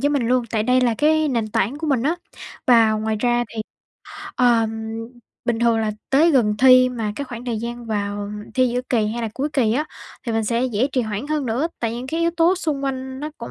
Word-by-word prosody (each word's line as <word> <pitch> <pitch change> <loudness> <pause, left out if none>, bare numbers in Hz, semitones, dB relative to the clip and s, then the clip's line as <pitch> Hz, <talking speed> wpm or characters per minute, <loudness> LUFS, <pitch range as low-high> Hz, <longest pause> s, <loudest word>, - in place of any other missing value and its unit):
với 285 - +2
mình 275 -5 0
luôn, 250 -1 +2
tại 220 -2 0
đây 255 +2 +3
là 240 -2 +2
cái 310 0 +3
nền 230 -4 -1
tảng 235 +7 -1
của 320 - -4
mình 270 -6 +1
á. 320 +5 +1 0.5
Và 230 -3 +6
ngoài 215 0 -1
ra 240 -1 +2
thì, 220 - -3 0.7
ờ, 235 -3 +3 0.8
bình 240 -2 0
thường 235 -1 +3
là 215 -1 0 0.2
tới 310 +5 +5
gần 230 -8 +3
thi 255 0 +7
mà 225 -4 -3
cái 285 - -3
khoảng 240 -2 -8
thời 235 -3 -2
gian 235 +1 -5
vào 205 -1 -3 0.2
thi 255 -1 +3
giữa 245 +1 -1
kỳ 220 -4 +2
hay 235 +2 -3
là 225 - -1
cuối 285 +3 -1
kỳ 230 -6 +2
á 295 +6 0 0.4
thì 230 - -1
mình 225 0 0
sẽ 235 +3 0
dễ 245 0 +1
trì 255 - +2
hoãn 220 +3 -3
hơn 300 -3 -1
nữa. 255 +9 0
Tại 230 -1 -1
những 250 +2 -6
cái 325 +4 -2
yếu 335 - +2
tố 340 +3 +4
xung 305 -7 -2
quanh 265 0 -4
nó 300 - -4
cũng 235 - -7
245 Hz, 240 wpm, -21 LUFS, 225-275 Hz, 0.8 s, thi